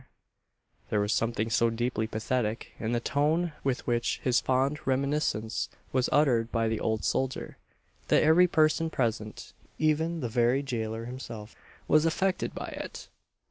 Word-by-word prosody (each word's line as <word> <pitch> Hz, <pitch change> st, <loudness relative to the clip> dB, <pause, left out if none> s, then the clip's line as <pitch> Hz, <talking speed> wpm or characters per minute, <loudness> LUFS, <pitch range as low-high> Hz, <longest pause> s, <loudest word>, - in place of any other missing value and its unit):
There 105 Hz, -, +1 dB
was 105 Hz, +1 st, +1 dB
something 115 Hz, -1 st, 0 dB
so 115 Hz, 0 st, +3 dB
deeply 115 Hz, -1 st, -1 dB
pathetic 110 Hz, +1 st, -2 dB
in 110 Hz, -, -2 dB
the 120 Hz, -, +1 dB
tone 155 Hz, +6 st, +1 dB
with 135 Hz, -2 st, -1 dB
which 120 Hz, -1 st, 0 dB
this 125 Hz, -2 st, +3 dB
fond 135 Hz, +3 st, +1 dB
reminiscence 135 Hz, -4 st, 0 dB, 0.2 s
was 130 Hz, -1 st, +2 dB
uttered 120 Hz, -6 st, +3 dB
by 115 Hz, -1 st, +1 dB
the 110 Hz, -1 st, -1 dB
old 110 Hz, -1 st, -1 dB
soldier, 130 Hz, 0 st, -2 dB, 0.5 s
that -, -, +4 dB
every 165 Hz, +4 st, +6 dB
person 160 Hz, 0 st, +2 dB
present, 115 Hz, -6 st, -3 dB, 0.2 s
even 160 Hz, +2 st, +1 dB
the 125 Hz, -, -1 dB
very 120 Hz, +4 st, +2 dB
gaoler 115 Hz, -3 st, -3 dB
himself, 115 Hz, -4 st, -8 dB, 0.3 s
was 155 Hz, +1 st, +5 dB
affected 190 Hz, +3 st, 0 dB
by -, -, -5 dB
it. -, -, -7 dB
125 Hz, 145 wpm, -29 LUFS, 115-150 Hz, 0.5 s, every